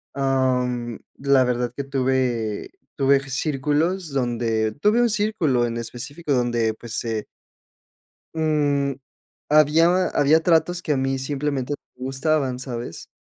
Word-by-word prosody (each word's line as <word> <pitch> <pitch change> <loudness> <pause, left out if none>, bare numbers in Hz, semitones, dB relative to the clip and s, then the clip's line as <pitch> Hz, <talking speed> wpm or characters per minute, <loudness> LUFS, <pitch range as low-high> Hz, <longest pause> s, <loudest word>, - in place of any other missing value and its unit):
Am, 125 -3 0 0.2
la 140 -1 +4
verdad, 125 -1 -1
que 140 - -3
tuve 130 -5 -1 0.3
tuve 140 0 +4
círculos, 150 +6 0
donde 115 -4 0
Tuve 215 +5 +4
un 240 - +3
círculo 205 - +1
en 115 0 -4
específico, 140 +6 -4
donde 120 -3 +1
pues, 115 0 -10
se 110 -2 -2 1.1
mm, 145 -3 +1 0.6
había 165 +5 +4
había 150 +3 +3
tratos, 170 +1 +2
que 155 - 0
a 135 - 0
mí, 135 0 0
simplemente, 140 0 -2 0.2
me 125 - -9
gustaban, 135 -1 0
¿sabes? 120 -8 -6
135 Hz, 125 wpm, -23 LUFS, 125-155 Hz, 1.1 s, la